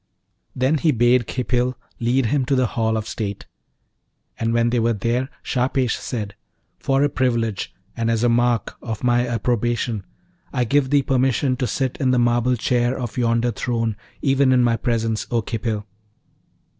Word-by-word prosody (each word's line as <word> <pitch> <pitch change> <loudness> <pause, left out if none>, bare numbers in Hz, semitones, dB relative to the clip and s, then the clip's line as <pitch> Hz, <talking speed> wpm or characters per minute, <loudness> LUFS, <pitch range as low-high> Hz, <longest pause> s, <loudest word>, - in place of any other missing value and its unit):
Then 135 +4 +2
he 160 - +2
bade 120 0 +3
Khipil 125 0 -1 0.2
lead 125 +2 +2
him 135 +4 +1
to 135 - +1
the 130 -1 +3
hall 110 -1 +1
of 110 0 -4
state. 100 -4 -4 0.9
And 115 0 0
when 115 0 +2
they 120 - +2
were 115 +1 +2
there 120 +5 -1
Shahpesh 125 -1 0
said, 105 -5 -4 0.5
'For 135 +1 +1
a - - +4
privilege, 115 -6 -1 0.2
and 115 -1 -1
as 115 0 +1
a - - +4
mark 120 -2 +1
of 110 -1 -5
my 120 0 +2
approbation, 120 -1 -1 0.5
I 125 - 0
give 135 +3 +2
thee 145 0 +3
permission 130 0 +1
to 125 -2 -1
sit 130 +3 -2
in 130 - +1
the 125 - +3
marble 120 +1 +2
chair 120 +2 +1
of 120 -4 -5
yonder 120 0 +1
throne, 115 -3 -1 0.3
even 135 -1 +3
in 125 -1 +4
my 120 -1 +3
presence, 115 -2 -1
O 115 -2 0
Khipil.' 110 -1 -3
120 Hz, 170 wpm, -22 LUFS, 115-130 Hz, 0.9 s, a